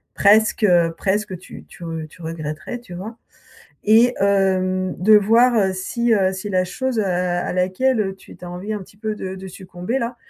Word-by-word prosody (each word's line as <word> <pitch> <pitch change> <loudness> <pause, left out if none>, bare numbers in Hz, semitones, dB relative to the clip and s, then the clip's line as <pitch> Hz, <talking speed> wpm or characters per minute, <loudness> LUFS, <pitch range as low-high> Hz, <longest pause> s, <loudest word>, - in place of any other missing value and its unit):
presque, 215 +2 +4
heu, 175 -4 +4
presque, 200 +1 -1
heu, 180 - -5
tu 180 - -12
tu - - -14 0.3
tu 175 - -17
regretterais 165 +7 -5
tu 235 -7 -12
vois? 215 +6 -7 0.7
Et 230 +4 +5
hem, 185 -2 +1
de 215 +3 +6
voir, 230 +4 +4
heu, 190 -3 +2
si, 235 +5 0
heu, 190 -3 +2
si 190 +2 -6
la 185 -1 +2
chose, 250 +5 -2
heu, - - +2
à 180 -1 0
à - - -3
laquelle, 190 +8 +1
heu, 195 -2 -3
tu - - -15
tu - - -11
as - - -7
envie 185 +4 -6
un 210 - -2
petit 200 - -20
peu 215 0 -3
de 190 -2 -5
de 190 0 -9
succomber 185 +5 -5
là, 240 0 -3
190 Hz, 210 wpm, -21 LUFS, 185-220 Hz, 0.7 s, de